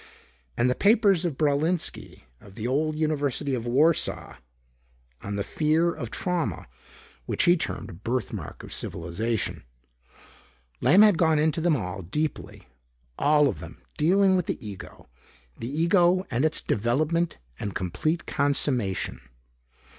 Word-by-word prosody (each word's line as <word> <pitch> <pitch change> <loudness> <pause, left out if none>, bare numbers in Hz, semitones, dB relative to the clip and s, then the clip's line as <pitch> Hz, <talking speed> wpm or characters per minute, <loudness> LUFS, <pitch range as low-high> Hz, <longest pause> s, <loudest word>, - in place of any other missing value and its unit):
And 120 - +3
the 125 - +3
papers 200 - +3
of 155 -6 -2
Braulinski 155 +3 -1 0.2
of 100 -2 -16
the 115 +1 -4
old 150 +4 0
University 145 -2 -1
of 120 -2 -3
Warsaw 150 +7 +1 0.8
on 100 0 -5
the 100 - -1
fear 155 +8 +1 0.2
trauma 165 - -2 0.6
which - - 0
he 175 - +5
termed 170 - -4
a - - -10
birthmark 115 +6 -4
of - - -9
civilization. 100 +7 -3 1.2
Lamb 170 - +6
had 210 -6 +5
gone 160 -2 +3
into 155 +1 +1
them 170 -2 +3
all, 90 -5 -4
deeply. 145 - -4 0.5
All 150 0 +4
of 130 - -3
them - - -11
dealing 190 +5 +3
with 180 -3 0
the 110 - -4
ego. 100 -2 -10 0.5
The 115 - -5
ego 175 +4 +3
and 125 +5 +1
its 155 - 0
development 155 +10 0 0.2
and 100 -3 -4
complete 155 - -2
consummation. 135 -8 0
150 Hz, 130 wpm, -26 LUFS, 120-170 Hz, 1.2 s, Lamb